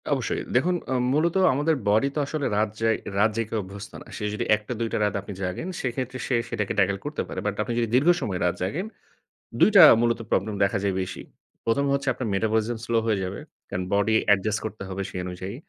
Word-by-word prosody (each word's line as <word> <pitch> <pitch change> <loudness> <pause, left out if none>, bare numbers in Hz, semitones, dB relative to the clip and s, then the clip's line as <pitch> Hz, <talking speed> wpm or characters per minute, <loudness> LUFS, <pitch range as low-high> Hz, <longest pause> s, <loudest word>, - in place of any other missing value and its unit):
অবশ্যই। - - -1
দেখুন 175 +9 +3
অ্যা 130 - 0 0.2
মূলত 160 +4 +2 0.2
আমাদের 150 +4 +1
বডি 110 +7 +3
তো - - 0
আসলে 145 0 -3
রাত 110 +1 +2
যাই 115 0 +3 0.2
রাত 105 +2 +4
জেগে 115 0 -2
অভ্যস্ত 100 +2 -9
না। - - -12
সে - - -6
যদি 105 - -2
১ 105 - -8
টা - - -2
২ 115 - 0
টা - - +1
রাত 105 - -1 0.3
জাগেন 90 - -3
সেক্ষেত্রে 130 0 -3
সে 130 - +1
সেটাকে 105 -2 -2
ট্যাকল 100 0 +2
করতে 150 +1 -3
পারে। - - -5
বাট 105 -1 -1
আপনি 120 - -3
যদি 115 - +1
দীর্ঘ 140 +7 +4
সময়ে 95 -5 -2
রাত 90 - +1
জাগেন 145 - -2 0.7
২ - - +7
টা 195 - +11 0.2
মূলত 120 0 +1
প্রবলেম 105 +2 0
দেখা 100 +2 +1
যায় 100 -2 0
বেশি। 95 +1 -5 0.4
১ম 130 +5 +2
হচ্ছে 140 0 -1
আপনার 125 - -4
মেটাবলিজম 110 +3 0
স্লো 115 0 +1
হয়ে 110 -2 +1
যাবে। 95 +2 -4 0.3
কারণ 90 - -2
বডি 100 +2 +2
অ্যাডজাস্ট 105 +1 +2
করতে 110 -2 -6
হবে 95 +1 -4
সেই 90 - -5
অনুযায়ী। 90 +3 -6
110 Hz, 215 wpm, -25 LUFS, 100-130 Hz, 0.7 s, টা